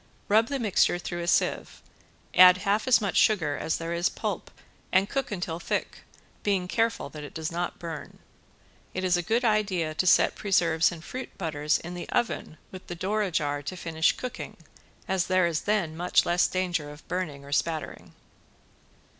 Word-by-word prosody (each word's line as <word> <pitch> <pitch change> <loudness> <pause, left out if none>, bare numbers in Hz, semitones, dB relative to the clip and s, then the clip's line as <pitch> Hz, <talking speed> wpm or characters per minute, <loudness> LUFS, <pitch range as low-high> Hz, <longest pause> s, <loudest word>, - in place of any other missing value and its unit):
Rub 220 +2 +4
the 280 - -2
mixture 210 -6 +2
through 175 0 -5
a 170 - -4
sieve, - - 0 0.5
add 180 0 +8
half 205 +4 +1
as 255 - +6
much 200 -3 -2
sugar 165 -9 +3
as 160 - -1
there 165 +1 -4
is 170 +2 +1
pulp - - -4 0.4
and 190 +1 +3
cook 270 +3 -2
until 175 -4 -3
thick, - - -3 0.4
being 195 -3 0
careful 225 +3 0
that 150 -1 -9
it 145 - -10
does 160 +1 -3
not 175 +1 -3
burn. 160 -4 -7 0.8
It 185 - -2
is 180 -1 +3
a 175 - +1
good 230 +7 0
idea 195 -7 +1
to 185 +4 -1
set - - +5
preserves 170 -5 +2
and 170 -2 -9
fruit 255 +6 -7
butters 150 -4 0
in 175 +1 -8
the 175 - -7
oven 220 -8 -1
with 185 -1 -10
the 175 - -5
door 205 +5 -1
ajar 155 -7 -1
to 145 +6 -6
finish 160 -1 +1
cooking 255 -1 -6 0.5
as 190 -2 0
there 185 -1 +3
is 170 -2 0
then 190 -7 +1
much 175 +2 +2
less 175 +1 +3
danger 175 -5 -2
of 150 +2 -13
burning 155 -7 -4
or 140 - -11
spattering. 155 +2 -2
175 Hz, 180 wpm, -27 LUFS, 160-200 Hz, 0.8 s, add